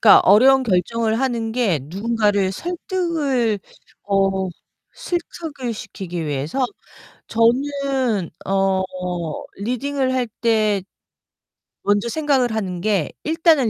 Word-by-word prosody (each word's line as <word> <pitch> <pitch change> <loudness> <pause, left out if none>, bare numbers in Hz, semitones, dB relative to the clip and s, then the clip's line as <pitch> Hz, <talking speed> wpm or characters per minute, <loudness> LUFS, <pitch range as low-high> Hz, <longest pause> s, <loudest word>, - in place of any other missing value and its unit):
그니까 215 - +9
어려운 260 +7 +6
결정을 225 +2 +1
하는 235 -4 -1
게 225 -9 +2
누군가를 205 - +1
설득을 320 - -1 0.5
어 195 -1 +1 0.5
실득을 325 -7 -4
시키기 180 -5 -6
위해서? 150 - -1 0.6
저는 255 - +1 0.2
어 195 0 +2 0.7
리딩을 260 +5 -1
할 255 -2 0
때 215 -4 +2 1.0
먼저 205 +3 +2
생각을 275 -4 +1
하는 190 -5 -2
게 200 -6 +1
일단은 320 -6 +3
230 Hz, 210 characters per minute, -21 LUFS, 195-270 Hz, 1.0 s, 그니까